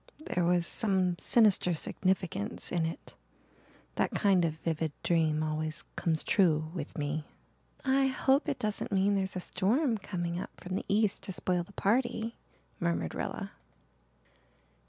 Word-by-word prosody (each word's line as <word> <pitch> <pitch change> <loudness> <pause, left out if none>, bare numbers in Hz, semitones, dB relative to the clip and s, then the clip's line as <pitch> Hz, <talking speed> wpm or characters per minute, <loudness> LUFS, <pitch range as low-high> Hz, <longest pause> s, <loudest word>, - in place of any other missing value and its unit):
There 180 - +1
was 175 0 +2
some 190 -4 +1
sinister 205 -6 +4
significance 185 - -1
in 165 -2 +1
it. 165 - -8 0.8
That - - +2
kind 195 -4 +3
of 160 -2 0
vivid 160 -1 -2
dream 160 -2 +2
always 155 0 -2
'comes 160 -2 +1
true' 155 -5 +2
with 160 -5 -6
me." 150 +1 -2 0.6
"I 270 0 +3
hope 270 +3 +2
it 280 - -1
doesn't 210 0 -3
mean 195 +1 +3
there's 190 -1 -1
a - - -1
storm 220 - +1
coming 175 -3 -3
up - - -5
from 180 +1 -6
the - - -3
east 210 0 +1
to - - -3
spoil 180 -1 0
the 180 +4 -11
party," 230 +2 0 0.4
murmured 170 - -1
Rilla. - - -4
180 Hz, 145 wpm, -30 LUFS, 160-205 Hz, 0.8 s, sinister